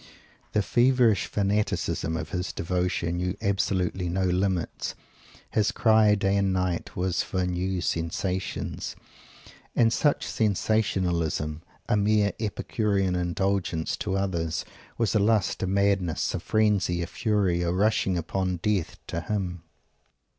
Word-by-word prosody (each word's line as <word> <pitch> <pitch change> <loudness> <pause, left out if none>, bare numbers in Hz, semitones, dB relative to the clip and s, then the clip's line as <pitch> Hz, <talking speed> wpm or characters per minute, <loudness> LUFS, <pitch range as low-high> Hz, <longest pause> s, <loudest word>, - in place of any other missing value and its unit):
The 105 - +2
feverish 120 -3 +3
fanaticism 100 -5 0
of 80 -1 -5
his 90 +1 -2
devotion 90 -1 -1
knew 90 +1 -2
absolutely 95 -3 0
no 95 +2 0
limits. 90 -1 -1 0.6
His 110 -1 +2
cry 110 -2 +4
day 100 0 +1
and 100 -1 +2
night 90 -2 -1
was 90 0 0
for 95 -1 -1
"new 90 +1 -1
sensations"; 90 +3 -2 0.8
and 115 -1 +4
such 145 +2 +2
"sensation," 105 -1 +1 0.8
a 120 - +2
mere 105 0 +3
epicurean 100 -3 0
indulgence 90 -1 -1
to 95 -2 -2
others, 85 -4 -1 0.3
was 115 -4 +1
a 110 - +3
lust, 105 -2 +2
a 95 - 0
madness, 95 -3 +1
a - - -2
frenzy, 100 -5 +1
a - - -1
fury, 95 -2 0
a 85 -1 0
rushing 95 -1 +2
upon 90 +2 -1
death, 100 -6 0
to 85 - -3
him. 90 -4 -3
95 Hz, 125 wpm, -26 LUFS, 90-105 Hz, 0.8 s, cry